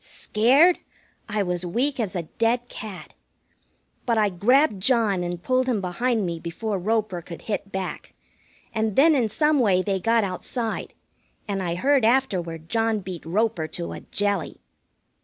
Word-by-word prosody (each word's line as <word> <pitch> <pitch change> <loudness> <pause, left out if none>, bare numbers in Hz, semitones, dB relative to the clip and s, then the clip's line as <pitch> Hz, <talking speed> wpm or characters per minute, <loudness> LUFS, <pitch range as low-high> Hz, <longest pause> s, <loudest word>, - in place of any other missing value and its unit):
Scared? 275 +12 +3 0.5
I 210 -1 0
was 180 -1 -2
weak 250 +11 -1
as 205 -4 -2
a 175 - -1
dead 235 +8 0
cat. 205 -4 -8 0.9
But 230 -2 +2
I 210 -1 +3
grabbed 215 - +3
John 215 -6 +2
and 175 0 -4
pulled 255 0 +1
him 230 -4 +1
behind 215 +4 0
me 170 -1 -3
before 195 +5 -3
Roper 215 -2 -1
could 170 0 -10
hit 205 -2 -4
back, 190 -1 -5 0.6
and 220 -2 -1
then 315 +4 +6
in 245 -6 +2
some 300 +6 +2
way 190 -6 +3
they 195 -1 -1
got 230 +3 +2
outside, 220 +5 -4 0.5
and 200 -2 -2
I 170 -2 -2
heard 270 +6 +2
afterward 180 -10 +1
John 225 0 +1
beat 180 -3 -7
Roper 195 -3 0
to 85 - -5
a 85 - -7
jelly. 200 - -2
210 Hz, 160 wpm, -24 LUFS, 180-235 Hz, 0.9 s, then